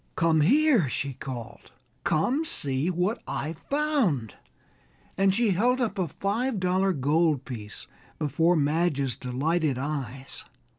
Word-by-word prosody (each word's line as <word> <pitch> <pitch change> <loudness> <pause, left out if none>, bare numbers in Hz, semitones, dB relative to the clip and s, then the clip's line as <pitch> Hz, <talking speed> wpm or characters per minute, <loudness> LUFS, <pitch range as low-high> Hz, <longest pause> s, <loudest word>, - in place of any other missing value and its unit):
"Come 165 -2 +3
here!" 255 - +4
she 140 +1 -3
called, 125 -3 -8 0.3
"come, 245 - +1
see 145 - -1
what 185 +6 -1
I've 155 +3 -4
found," 275 - +1 0.8
and 195 0 +3
she 220 +2 +2
held 245 +8 +2
up 230 -5 -1
a 180 - +1
five 210 - -2
dollar 185 +1 +2
gold 150 -1 +1
piece 110 -5 -7 0.3
before 165 +4 +2
Madge's 145 -3 +1
delighted 140 +3 -1
eyes. 135 -2 -5
165 Hz, 120 wpm, -27 LUFS, 140-195 Hz, 0.8 s, here